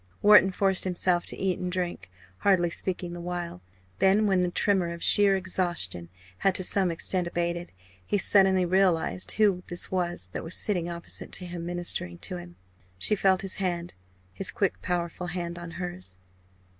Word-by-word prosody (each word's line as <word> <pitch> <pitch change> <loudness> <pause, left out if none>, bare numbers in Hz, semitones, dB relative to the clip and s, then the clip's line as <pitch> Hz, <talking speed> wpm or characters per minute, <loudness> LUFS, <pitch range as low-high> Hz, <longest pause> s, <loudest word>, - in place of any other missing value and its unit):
Wharton 205 -2 +7
forced 190 0 +1
himself 180 -1 +1
to - - 0
eat 190 -2 -1
and 180 0 -3
drink, 175 - -3 0.3
hardly 175 - +2
speaking 175 -1 -1
the 175 - -7
while. 175 - -5 0.4
Then, 200 +3 +4
when 190 -3 +3
the 180 - +1
tremor 185 -2 +1
of 170 - -8
sheer 200 -1 +6
exhaustion 175 - -3 0.3
had 195 -1 +2
to 185 - -2
some 190 0 +1
extent 175 +2 -1
abated, 170 0 -2 0.3
he 205 - 0
suddenly 190 -2 +4
realised 185 -1 +1
who 200 -4 +3
this 175 - -4
was 175 - -2
that - - -4
was 165 - -5
sitting 175 -5 -1
opposite 170 0 -6
to 180 - -2
him 175 -1 -6
ministering 175 - 0
to 90 - -5
him. 85 0 -11 0.4
She 210 - +4
felt 190 -2 +2
his 195 - -1
hand 175 -3 -2 0.4
his 195 - -1
quick 195 - -1
powerful 175 0 -3
hand 175 -1 -4
on 175 -1 -7
hers. 175 - -6
180 Hz, 170 wpm, -27 LUFS, 170-190 Hz, 0.4 s, Wharton